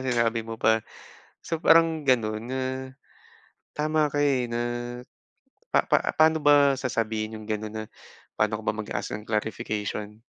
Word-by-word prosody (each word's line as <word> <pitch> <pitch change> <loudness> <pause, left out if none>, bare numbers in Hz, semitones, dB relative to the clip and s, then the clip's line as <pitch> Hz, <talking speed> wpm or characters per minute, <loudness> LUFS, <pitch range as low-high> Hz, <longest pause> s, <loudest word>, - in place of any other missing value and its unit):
sinabi 115 -3 +1
mo 115 0 -6
pa. 110 0 +3 0.6
So, 165 - -2
parang 165 -2 +4
gano'n 110 -4 +1
na 130 0 -2 1.2
tama 155 0 +1
ka, 145 - -1
eh, 130 -4 +2
na 120 0 -3 1.1
pa-pa - - +4 0.2
paano 160 0 +5
ba 145 -1 +6
sasabihin 110 -4 -2
'yong 110 0 -11
gano'n 110 0 -3
na 110 0 -4 0.5
paano 110 0 +1
ka - - -15
ba - - +1
mag-ask 110 - -4
ng 105 - -12
clarification? 105 -1 -3
115 Hz, 140 wpm, -26 LUFS, 110-140 Hz, 1.2 s, ba